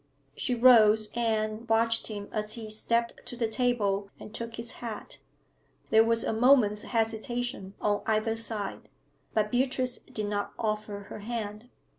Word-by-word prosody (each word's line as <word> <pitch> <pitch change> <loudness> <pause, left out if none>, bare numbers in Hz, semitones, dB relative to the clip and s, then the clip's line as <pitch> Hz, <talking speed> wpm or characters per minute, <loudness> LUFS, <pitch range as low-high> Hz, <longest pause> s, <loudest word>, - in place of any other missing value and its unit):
She 250 - -1
rose 220 -3 +6
and 220 -1 -1
watched 225 0 +2
him 205 -2 -5
as 215 0 -2
he 220 -3 -7
stepped 235 +2 -1
to - - -5
the 235 -2 +1
table 220 -5 0
and 210 - -10
took 230 -1 -5
his 235 0 -5
hat. 225 -3 -7 0.7
There 220 0 +7
was 230 0 +2
a - - -1
moment's 220 -3 +4
hesitation 225 -3 -2
on 205 -1 +1
either 220 +1 +1
side, 225 -2 -3 0.5
but 210 -1 +1
Beatrice 255 0 +1
did 215 - -4
not 205 0 -2
offer 215 -2 -2
her - - -6
hand. 215 +1 -5
225 Hz, 150 wpm, -29 LUFS, 210-235 Hz, 0.7 s, There